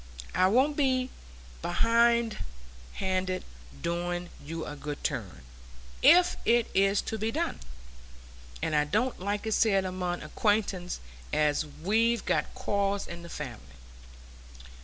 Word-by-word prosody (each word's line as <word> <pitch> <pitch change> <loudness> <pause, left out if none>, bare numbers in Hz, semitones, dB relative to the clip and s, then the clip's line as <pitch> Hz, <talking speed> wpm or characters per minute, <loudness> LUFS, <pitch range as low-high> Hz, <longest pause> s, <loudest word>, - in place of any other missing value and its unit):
I 185 0 +4
won't 260 +9 +3
be 260 -3 +1 0.5
behindhand 235 +4 +3 0.9
i' 185 - -1 0.4
doing 175 +1 -2
you 160 +2 -5
a 145 - -6
good 145 0 -6
turn, 90 - -3 0.6
if 355 +2 +6
it 235 0 +3
is 195 +1 +3
to 220 - -4
be 220 +2 0
done. 330 +5 -2 1.0
And 155 - 0
I 150 - +4
don't 245 +12 0
like 205 +3 -2
it 220 - -1
said 195 -3 +3
among 180 -1 -3
acquaintance 205 -5 0 0.3
as 150 0 +2 0.2
we've 225 +4 +2
got - - 0
quarrels 200 0 0
in 170 0 -7
the 170 - -10
family. 65 - -8
195 Hz, 125 wpm, -29 LUFS, 170-230 Hz, 1.0 s, if